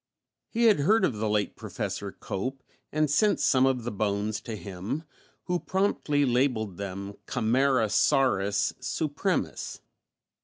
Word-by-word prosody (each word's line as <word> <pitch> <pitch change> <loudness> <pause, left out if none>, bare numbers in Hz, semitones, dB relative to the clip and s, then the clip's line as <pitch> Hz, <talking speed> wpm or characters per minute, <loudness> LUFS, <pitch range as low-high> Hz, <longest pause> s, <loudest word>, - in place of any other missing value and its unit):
He 235 0 0
had 220 -8 +6
heard 210 +10 +4
of 120 - -1
the 110 0 -1
late 105 -1 0
Professor - - -4
Cope 130 +8 -5 0.3
and 155 0 +2
sent 205 +9 +3
some 130 0 +4
of 130 -3 0
the 120 - -3
bones 105 +1 -1
to 115 - -6
him, 100 - -5 0.4
who 180 -1 -1
promptly 165 -8 +1
labelled 120 -7 +1
them 100 0 -5
Camarasaurus 110 -4 +2
supremus. 140 +3 -2
125 Hz, 125 wpm, -28 LUFS, 105-145 Hz, 0.4 s, had